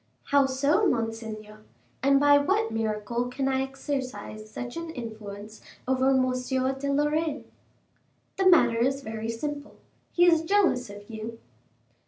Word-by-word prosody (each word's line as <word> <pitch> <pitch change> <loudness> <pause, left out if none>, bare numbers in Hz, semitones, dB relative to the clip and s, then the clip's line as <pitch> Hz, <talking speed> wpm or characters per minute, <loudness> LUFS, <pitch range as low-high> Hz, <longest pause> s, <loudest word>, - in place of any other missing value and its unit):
"How 280 -1 +5
so, 285 +10 +2
monseigneur: 225 - -3 0.4
and 275 +1 +4
by 285 0 +6
what 400 +10 +1
miracle 225 +2 -2
can 265 +2 -2
I 265 0 +1
exercise 260 -6 -5
such 245 +2 -6
an 335 0 -5
influence 220 -5 -8 0.3
over 260 0 +2
M. 260 -1 +3 0.5
de 280 +1 -2
Lorraine?" 295 +1 0 0.9
"The 385 -1 +5
matter 235 -10 +5
is 270 +3 +1
very 220 -1 -5
simple, 285 +5 -5 0.4
he 350 - +4
is 330 -2 +5
jealous 325 - +2
of 205 0 -11
you." 225 0 -7
260 Hz, 135 wpm, -27 LUFS, 225-290 Hz, 0.9 s, by